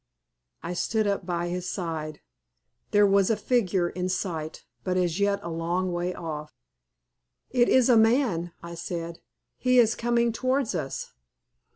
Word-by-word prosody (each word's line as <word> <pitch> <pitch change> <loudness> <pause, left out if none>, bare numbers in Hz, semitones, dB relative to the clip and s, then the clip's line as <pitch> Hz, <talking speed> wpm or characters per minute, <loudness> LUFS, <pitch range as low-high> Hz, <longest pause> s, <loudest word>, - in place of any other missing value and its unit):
I 175 - -3
stood 220 +4 0
up 200 -3 -1
by 175 -1 -1
his 180 +1 -3
side. 160 -4 -4 0.7
There 205 0 +5
was 195 -1 +4
a 225 - +2
figure 195 -8 +1
in 180 +1 -3
sight, 165 -4 -3 0.2
but 185 -1 0
as 175 0 0
yet 200 0 +2
a 170 - -5
long 175 +3 -1
way 175 +1 -1
off. 150 -4 -6 1.0
"It 245 -2 +3
is 255 -2 +5
a 245 -3 +6
man," 220 -7 +3
I 170 0 -7
said. 170 0 -5 0.4
"He 255 0 +3
is 230 -2 +5
coming 235 0 +1
towards 255 +1 0
us." 150 -6 -4
185 Hz, 155 wpm, -26 LUFS, 170-225 Hz, 1.0 s, a